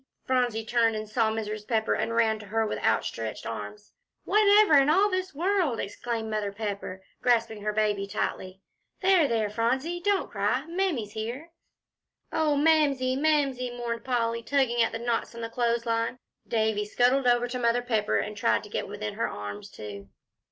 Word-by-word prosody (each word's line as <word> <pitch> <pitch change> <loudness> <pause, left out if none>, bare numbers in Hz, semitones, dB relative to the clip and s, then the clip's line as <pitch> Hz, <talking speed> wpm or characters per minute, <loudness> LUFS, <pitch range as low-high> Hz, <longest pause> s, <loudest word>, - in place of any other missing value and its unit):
Phronsie 245 -4 0
turned 230 -1 +2
and 215 0 -4
saw 220 +1 +1
Mrs. 215 -1 -4
Pepper, 220 -2 +1
and 230 +1 -1
ran 220 -2 +2
to 210 - -11
her 225 +2 0
with 210 - -3
outstretched - - -1
arms. 420 - -7 0.3
"Whatever 420 -3 +5
in 275 +1 +3
all 390 +6 +4
this 370 -3 -2
world," 345 - +1
exclaimed 225 +2 -4
Mother 215 -2 -2
Pepper, 200 -2 -5 0.2
grasping 230 -3 +1
her 210 +1 -1
baby 210 -2 0
tightly. 190 -1 -4 0.4
"There 370 -5 +5
there 225 -4 0
Phronsie, 260 +10 0
don't 405 -2 +1
cry, 210 +7 0
Mammy's 330 - -1
here." 235 +10 -5 0.8
"Oh, 310 -2 +2
Mamsie 285 -4 +3
Mamsie!" 275 -4 +1
mourned 235 -1 -4
Polly, 230 -2 0
tugging 240 -2 +1
at 230 - +2
the 225 - -3
knots 235 0 -2
in 235 - -7
the 230 - -4
clothes 235 0 0
line. 230 +1 -1 0.3
Davie 220 -2 +1
scuttled 250 +5 +2
over 240 0 +3
to 250 +1 -4
Mother 240 0 +2
Pepper 220 -4 +1
and 210 - -3
tried 205 - +1
to 210 - -11
get - - -3
within 205 +1 -5
her 220 - -1
arms, 105 0 -7
too. 100 -2 -9
230 Hz, 175 wpm, -27 LUFS, 215-270 Hz, 0.8 s, Whatever